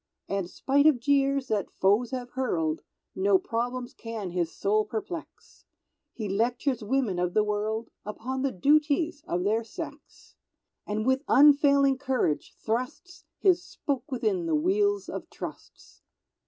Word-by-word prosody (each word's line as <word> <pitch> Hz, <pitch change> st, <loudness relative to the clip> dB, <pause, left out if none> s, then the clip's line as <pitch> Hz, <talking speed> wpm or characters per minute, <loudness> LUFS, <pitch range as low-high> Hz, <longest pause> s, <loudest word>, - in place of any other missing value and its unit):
And 195 Hz, -2 st, -2 dB
spite 280 Hz, +8 st, +2 dB
of 290 Hz, -6 st, +4 dB
jeers 275 Hz, +1 st, +2 dB
that 205 Hz, -4 st, 0 dB
foes 205 Hz, +5 st, +3 dB
have 250 Hz, -2 st, -5 dB
hurled, 165 Hz, -12 st, -1 dB, 0.3 s
No 195 Hz, +1 st, +4 dB
problems 245 Hz, +4 st, -3 dB
can 225 Hz, -5 st, -6 dB
his 170 Hz, -2 st, -1 dB
soul 215 Hz, +2 st, +1 dB
perplex; 230 Hz, +10 st, -7 dB, 0.5 s
He 220 Hz, -3 st, -5 dB
lectures 235 Hz, +4 st, 0 dB
women 215 Hz, -5 st, 0 dB
of 180 Hz, 0 st, -1 dB
the 215 Hz, -, +5 dB
world 215 Hz, +2 st, -2 dB
Upon 255 Hz, +5 st, -4 dB
the 275 Hz, 0 st, 0 dB
duties 300 Hz, -, +2 dB
of 180 Hz, +1 st, -1 dB
their 220 Hz, +4 st, +1 dB
sex, 225 Hz, -, -10 dB, 0.5 s
And 215 Hz, +1 st, -2 dB
with 260 Hz, +1 st, +2 dB
unfailing 280 Hz, -1 st, +5 dB
courage 260 Hz, -, -1 dB
thrusts 280 Hz, +10 st, -4 dB
His 365 Hz, -3 st, +3 dB
spoke 275 Hz, 0 st, -4 dB
within 350 Hz, -, 0 dB
the 320 Hz, -, +2 dB
wheels 400 Hz, +5 st, +1 dB
of -, -, -6 dB
trusts. -, -, -10 dB
250 Hz, 140 wpm, -27 LUFS, 210-285 Hz, 0.5 s, the